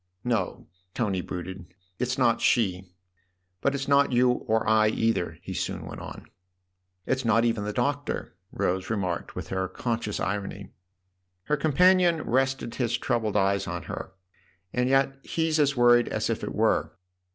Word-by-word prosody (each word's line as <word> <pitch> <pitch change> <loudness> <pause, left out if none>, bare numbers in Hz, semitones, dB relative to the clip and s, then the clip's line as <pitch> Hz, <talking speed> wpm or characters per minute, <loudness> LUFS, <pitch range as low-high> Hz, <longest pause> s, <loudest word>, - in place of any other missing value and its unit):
"No," 115 -7 -1 0.3
Tony 100 -6 0
brooded; 90 0 -7 0.2
"it's 125 +1 -1
not 120 -3 +3
she. 95 -6 +2 0.7
But 140 - +1
it's 135 0 -3
not 140 0 +4
you 125 0 +3
and 110 0 +3
I 110 0 +5
either," 110 -4 0
he - - -6
soon - - -3
went - - -8
on. - - -9 0.4
" 90 0 -50
It's 130 0 0
not 115 0 +3
even 115 -3 0
the 105 - -2
Doctor," 145 +5 -2 0.2
Rose 95 +1 -1
remarked 95 -6 -2
with - - -6
her 95 0 -1
conscious 115 -1 -3
irony. 100 +1 -4 0.7
Her 150 - +1
companion 170 +2 +4
rested 130 -1 0
his 120 -2 0
troubled 110 -4 0
eyes 100 0 +1
on - - -4
her. - - -7 0.6
"And 125 +1 +1
yet 135 0 +2
he's 160 0 0
as 140 -2 +2
worried 120 0 +5
as - - -1
if - - -3
it - - -4
were." - - +1
115 Hz, 160 wpm, -27 LUFS, 100-135 Hz, 0.7 s, I